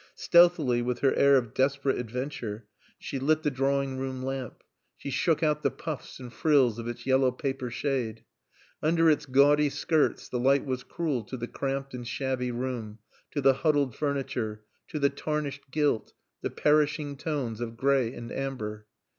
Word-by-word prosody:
Stealthily, 170 Hz, -8 st, +4 dB
with 120 Hz, 0 st, -2 dB
her 135 Hz, -, +4 dB
air 140 Hz, 0 st, +5 dB
of 120 Hz, -4 st, -2 dB
desperate 135 Hz, 0 st, +1 dB
adventure, 120 Hz, -3 st, -5 dB, 0.3 s
she 135 Hz, -, -5 dB
lit 155 Hz, +4 st, +2 dB
the 150 Hz, -, +1 dB
drawing 135 Hz, 0 st, 0 dB
room 130 Hz, -1 st, -4 dB
lamp. 135 Hz, -2 st, -5 dB, 0.3 s
She 140 Hz, -, -6 dB
shook 165 Hz, +4 st, +1 dB
out 150 Hz, -1 st, +2 dB
the -, -, +2 dB
puffs 155 Hz, -5 st, -7 dB
and 125 Hz, -2 st, -9 dB
frills 130 Hz, -8 st, +3 dB
of 115 Hz, -, -5 dB
its 120 Hz, -, -6 dB
yellow 130 Hz, -1 st, +3 dB
paper 130 Hz, 0 st, -3 dB
shade. 120 Hz, -3 st, -2 dB, 0.6 s
Under 165 Hz, +1 st, +4 dB
its 150 Hz, -1 st, 0 dB
gaudy 145 Hz, +3 st, +5 dB
skirts 155 Hz, +2 st, 0 dB
the 125 Hz, -, -3 dB
light 135 Hz, +3 st, +3 dB
was 130 Hz, -2 st, -2 dB
cruel 150 Hz, -8 st, -2 dB
to 130 Hz, -, -6 dB
the 120 Hz, 0 st, -4 dB
cramped 135 Hz, 0 st, -3 dB
and 120 Hz, -1 st, -6 dB
shabby 130 Hz, -1 st, -2 dB
room, 120 Hz, -3 st, -4 dB, 0.3 s
to 145 Hz, -, -2 dB
the 135 Hz, 0 st, +6 dB
huddled 145 Hz, -3 st, +1 dB
furniture, 125 Hz, -7 st, -2 dB, 0.2 s
to -, -, -5 dB
the 140 Hz, -1 st, +2 dB
tarnished 145 Hz, -1 st, -4 dB
gilt, 145 Hz, -5 st, 0 dB, 0.3 s
the -, -, -2 dB
perishing 150 Hz, -1 st, +1 dB
tones 135 Hz, -6 st, -3 dB
of 115 Hz, -1 st, -5 dB
gray 135 Hz, -2 st, +2 dB
and 120 Hz, -2 st, -8 dB
amber. 105 Hz, -6 st, -4 dB
135 Hz, 170 wpm, -28 LUFS, 125-145 Hz, 0.6 s, the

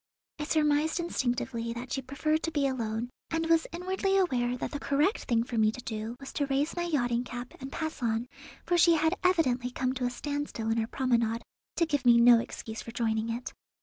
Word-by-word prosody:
I 295 Hz, -, -2 dB
surmised 305 Hz, +1 st, +2 dB
instinctively 240 Hz, -7 st, -1 dB
that 240 Hz, +2 st, -6 dB
she 270 Hz, -, -1 dB
preferred 305 Hz, +4 st, -1 dB
to 330 Hz, -, -2 dB
be 290 Hz, -3 st, +1 dB
alone, 235 Hz, -2 st, -2 dB, 0.2 s
and 325 Hz, 0 st, -1 dB
was 325 Hz, 0 st, +3 dB
inwardly 380 Hz, +3 st, 0 dB
aware 250 Hz, -10 st, +1 dB
that -, -, -4 dB
the 290 Hz, -, -4 dB
correct 290 Hz, +10 st, +1 dB
thing 230 Hz, -1 st, +2 dB
for 235 Hz, -1 st, -2 dB
me 215 Hz, 0 st, +4 dB
to 235 Hz, -, -9 dB
do 220 Hz, +1 st, -4 dB
was 275 Hz, -, -9 dB
to 285 Hz, -2 st, 0 dB
raise 275 Hz, +3 st, 0 dB
my 345 Hz, -1 st, -1 dB
yachting 245 Hz, -7 st, +1 dB
cap 245 Hz, 0 st, -7 dB
and 265 Hz, 0 st, -7 dB
pass 315 Hz, -2 st, -4 dB
on, 230 Hz, 0 st, 0 dB, 0.4 s
for 350 Hz, 0 st, +2 dB
she 335 Hz, 0 st, +6 dB
had 320 Hz, +2 st, +2 dB
evidently 260 Hz, -9 st, +2 dB
come 255 Hz, 0 st, -1 dB
to 255 Hz, -1 st, -2 dB
a -, -, +1 dB
standstill 285 Hz, -4 st, -3 dB
in 225 Hz, -, +1 dB
her 225 Hz, -, 0 dB
promenade, 235 Hz, -3 st, 0 dB, 0.3 s
to 335 Hz, -, +3 dB
give 290 Hz, -5 st, -1 dB
me 240 Hz, -2 st, +7 dB
no 235 Hz, 0 st, +8 dB
excuse 220 Hz, -1 st, -6 dB
for -, -, -9 dB
joining 225 Hz, -1 st, 0 dB
it. 235 Hz, +2 st, -4 dB
260 Hz, 215 wpm, -29 LUFS, 235-315 Hz, 0.4 s, no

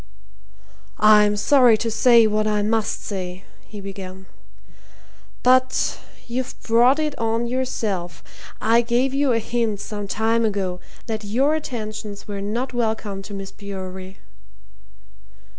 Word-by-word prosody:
"I'm 210 Hz, -1 st, +5 dB
sorry 245 Hz, -1 st, +5 dB
to 230 Hz, +1 st, -2 dB
say 235 Hz, 0 st, +5 dB
what 215 Hz, 0 st, +1 dB
I 210 Hz, -1 st, +1 dB
must 220 Hz, 0 st, -1 dB
say," 185 Hz, -2 st, -5 dB, 0.2 s
he 210 Hz, -, -9 dB
began. 190 Hz, -1 st, -8 dB, 1.2 s
"But 255 Hz, +1 st, +3 dB, 0.3 s
you've 250 Hz, +1 st, -4 dB
brought 240 Hz, +4 st, +4 dB
it 305 Hz, -2 st, -1 dB
on 225 Hz, +1 st, 0 dB
yourself. 220 Hz, -8 st, -3 dB, 0.4 s
I 230 Hz, +1 st, +4 dB
gave 245 Hz, +3 st, 0 dB
you 275 Hz, -1 st, +2 dB
a 230 Hz, -, +3 dB
hint 230 Hz, -2 st, -1 dB
some 205 Hz, -1 st, -5 dB
time 225 Hz, +3 st, +1 dB
ago 195 Hz, -4 st, -1 dB, 0.3 s
that 220 Hz, -1 st, -4 dB
your 255 Hz, +9 st, +1 dB
attentions 215 Hz, -8 st, -5 dB
were 200 Hz, -1 st, -5 dB
not 235 Hz, +6 st, -3 dB
welcome 220 Hz, -4 st, -2 dB
to 205 Hz, -, -10 dB
Miss 195 Hz, 0 st, -7 dB
Bewery." 190 Hz, -1 st, -8 dB
220 Hz, 125 wpm, -22 LUFS, 200-240 Hz, 1.2 s, I'm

